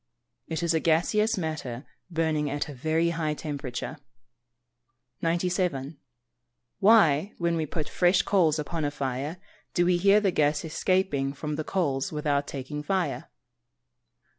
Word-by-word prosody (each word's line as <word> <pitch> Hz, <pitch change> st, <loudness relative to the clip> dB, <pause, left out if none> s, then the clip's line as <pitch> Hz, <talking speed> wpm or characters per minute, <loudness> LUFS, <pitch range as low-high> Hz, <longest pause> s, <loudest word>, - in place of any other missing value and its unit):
_ -, -, -54 dB, 0.4 s
It 160 Hz, +1 st, -3 dB
is 170 Hz, -1 st, +2 dB
gaseous 210 Hz, +7 st, +2 dB
matter 155 Hz, -7 st, -4 dB, 0.2 s
burning 160 Hz, -3 st, 0 dB
at 145 Hz, +1 st, -2 dB
a 145 Hz, -, -7 dB
very 160 Hz, +5 st, +1 dB
high 155 Hz, -2 st, -1 dB
temperature. 145 Hz, -5 st, -5 dB, 1.2 s
97. 170 Hz, -4 st, -1 dB, 0.8 s
_Why, 195 Hz, -4 st, +5 dB
when 170 Hz, -1 st, 0 dB
we 160 Hz, -2 st, -1 dB
put 155 Hz, 0 st, -3 dB
fresh 180 Hz, 0 st, +3 dB
coals 165 Hz, -6 st, +3 dB
upon 160 Hz, +1 st, -3 dB
a 145 Hz, -, +1 dB
fire, 140 Hz, +3 st, -3 dB, 0.4 s
do 175 Hz, -, +3 dB
we 180 Hz, 0 st, +3 dB
hear 200 Hz, +3 st, +5 dB
the 200 Hz, -3 st, +1 dB
gas 150 Hz, -1 st, +1 dB
escaping 155 Hz, -5 st, 0 dB
from 150 Hz, +1 st, -4 dB
the 155 Hz, -, -3 dB
coals 145 Hz, -7 st, -1 dB
without 145 Hz, -2 st, 0 dB
taking 140 Hz, +2 st, -5 dB
fire? 190 Hz, +3 st, -2 dB
160 Hz, 140 wpm, -27 LUFS, 145-175 Hz, 1.2 s, Why